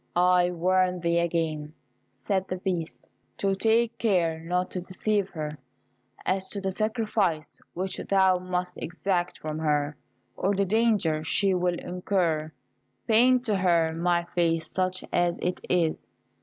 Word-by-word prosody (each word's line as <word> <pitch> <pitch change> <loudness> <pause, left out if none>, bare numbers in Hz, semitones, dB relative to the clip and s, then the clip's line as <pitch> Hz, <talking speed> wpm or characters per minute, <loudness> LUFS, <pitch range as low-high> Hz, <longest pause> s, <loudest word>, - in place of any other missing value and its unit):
"I 180 0 +4
warn 180 +1 +1
thee 170 0 +2
again," 160 -3 -1 0.4
said 190 -2 -1
the 185 - -2
Beast, 180 -3 -4 0.3
"to 195 -1 +1
take 230 +3 +1
care 175 -8 +1
not 180 +2 -2
to 185 - -3
deceive 195 +2 -1
her 150 -4 -5 0.7
as 190 0 0
to 200 - -4
the 190 -1 -2
sacrifice 210 -6 -1
which 185 +1 -3
thou 190 -2 +4
must 180 0 -3
exact 180 0 -1
from 155 0 -5
her, 150 -1 0 0.4
or 200 +1 0
the 200 +1 +2
danger 200 -7 +2
she 195 +4 +2
will 180 -1 +1
incur. 175 -4 -1 0.6
Paint 245 +3 +4
to 210 -4 +1
her 170 -3 +2
my 170 +1 +1
face 165 -2 +1
such 185 0 -1
as 175 -1 +2
it 180 +1 -2
is. 170 -3 0
180 Hz, 140 wpm, -27 LUFS, 165-195 Hz, 0.7 s, I